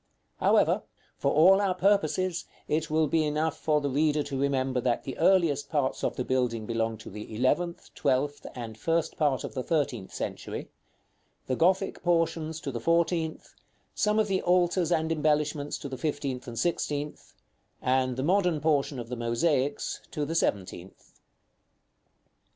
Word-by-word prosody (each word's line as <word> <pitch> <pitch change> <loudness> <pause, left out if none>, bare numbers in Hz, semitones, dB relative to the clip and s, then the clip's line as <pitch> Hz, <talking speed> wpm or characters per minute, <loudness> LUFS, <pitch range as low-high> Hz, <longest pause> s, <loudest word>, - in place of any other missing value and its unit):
However, - - +3 0.4
for - - +1
all 190 +6 +6
our 190 -2 +1
purposes, 185 -2 +1 0.2
it 155 +1 0
will 155 +1 +3
be 155 +2 +2
enough 155 +1 0
for 150 -1 +1
the 145 - -1
reader 150 +1 +2
to 140 -2 -4
remember 130 -2 0
that 120 -1 0
the 135 - -5
earliest 160 -7 +3
parts 140 -4 -1
of - - 0
the 125 - -2
building 125 -4 0
belong 115 0 -1
to - - -8
the 105 +2 -8
eleventh, 170 - 0
twelfth, 140 +1 0
and 115 -3 -7
first 165 +8 0
part 145 -4 +1
of - - -6
the 130 - -2
thirteenth 125 - -1
century; - - -5 0.7
the 130 - -1
Gothic 185 +5 +1
portions 165 -2 0
to 140 - -4
the 120 - -4
fourteenth; 165 +2 0 0.4
some 210 0 +1
of 215 -1 +3
the 190 -2 0
altars 175 -1 +2
and 160 -1 +1
embellishments 150 -1 0
to - - -7
the 130 -2 -7
fifteenth 140 -4 -3
and 120 -1 -7
sixteenth; 150 0 -2 0.4
and 130 -1 +1
the 130 - -1
modern 180 -1 +2
portion 145 -2 +1
of 120 -2 -5
the 125 - -4
mosaics 130 +4 0
to 150 - -2
the 160 - -3
seventeenth. 95 - -3
150 Hz, 160 wpm, -28 LUFS, 130-165 Hz, 0.7 s, all